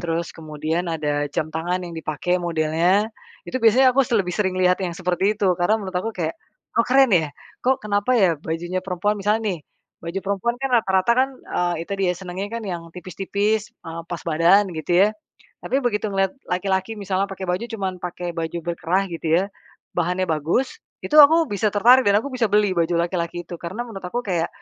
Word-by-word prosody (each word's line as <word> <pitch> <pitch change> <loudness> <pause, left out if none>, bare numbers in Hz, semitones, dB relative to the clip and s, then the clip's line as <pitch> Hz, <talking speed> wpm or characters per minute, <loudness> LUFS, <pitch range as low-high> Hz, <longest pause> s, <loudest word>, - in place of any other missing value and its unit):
terus 170 -1 -2
kemudian 160 +2 -3
ada 145 -2 -1
jam 155 - -1
tangan 175 +3 -1
yang 170 - -7
dipakai 160 +3 -1
modelnya, 170 +4 +1 0.4
itu 255 - -3
biasanya 255 +3 +6
aku 275 - +4
se 240 - -7
lebih 180 -4 0
sering 190 -3 0
lihat 180 0 +3
yang 175 -3 -3
seperti 185 +3 0
itu. 200 -1 0
Karena 210 +5 +3
menurut 190 -2 -6
aku 185 +5 -1
kayak, 165 -3 -2 0.4
oh, 230 - +4
keren 265 -1 +5
ya. 160 -4 +2 0.4
Kok, 260 -2 +1
kenapa 205 +4 +1
ya, 190 -6 +4
bajunya 175 +4 -3
perempuan 185 +2 -1
misalnya 215 +3 +1
nih, 165 - -10 0.4
baju 170 +3 -4
perempuan 200 +5 -1
kan, 270 - -1
rata-rata 190 0 +2
kan, 265 - +2
eee, 175 -6 -2
itu 200 - -6
dia 180 -2 +2
senangnya 190 +2 -5
kan, 230 -1 -4
yang 175 -4 -4
tipis-tipis, 200 +4 -1 0.2
ah, 165 0 -5
pas 175 -2 -4
badan 170 +6 +4
gitu, 175 +4 +3
ya. - - +2 0.6
Tapi 270 +3 +1
begitu 215 -2 0
ngelihat 195 0 +1 0.2
laki-laki 190 +3 -1
misalnya 195 -1 0
pakai 190 0 -6
baju 180 +6 -1
cuman 200 -5 -3
pakai 175 0 -4
baju 165 +1 -3
berkerah 175 +3 0
gitu 165 -1 -5 0.2
ya, - - -1 0.5
bahannya 180 +2 +1
bagus, 165 - 0 0.3
itu 305 - 0
aku 320 +2 +7
bisa 205 +1 +1
tertarik 245 +5 +6
dan 200 0 +5
aku 280 - -5
bisa 250 -2 0
beli 210 -2 +3
baju 170 +1 +1
laki-laki 170 0 -1
itu. 175 - -7
Karena 175 +7 -5
menurut 195 -6 -9
aku 240 +7 -2
kayak, 175 -4 0
185 Hz, 195 wpm, -22 LUFS, 170-210 Hz, 0.6 s, aku